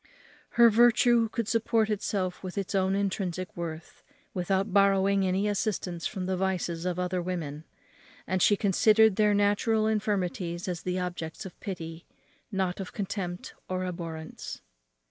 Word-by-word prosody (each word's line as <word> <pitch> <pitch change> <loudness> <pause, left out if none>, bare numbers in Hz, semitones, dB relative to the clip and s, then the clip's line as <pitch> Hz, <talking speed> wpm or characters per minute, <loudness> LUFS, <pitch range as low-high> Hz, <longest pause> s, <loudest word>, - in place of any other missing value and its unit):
Her 235 -1 +8
virtue 235 0 +5
could 230 -1 -3
support 225 -1 +2
itself 195 -3 -2
with 185 +1 -7
its 195 0 -2
own 190 0 +2
intrinsic 185 -2 -2
worth, 165 -2 -7 0.3
without 190 +1 0
borrowing 195 0 +4
any 190 +3 +1
assistance 195 -4 -1
from 190 -3 -4
the 185 0 0
vices 180 -2 -1
of 180 -1 -1
other 180 0 -1
women; 160 -4 -4 0.6
and 185 +1 -1
she 205 - +5
considered 215 +2 +4
their 210 0 +3
natural 205 +2 +2
infirmities 195 -5 -1
as 175 -3 -3
the 180 0 -2
objects 175 -3 -4
of 185 - -10
pity, 165 -5 -6 0.4
not 190 -2 -1
of 190 - -6
contempt 185 -3 -4 0.2
or 185 0 -1
abhorrence. 165 -3 -6
190 Hz, 145 wpm, -28 LUFS, 180-205 Hz, 0.6 s, Her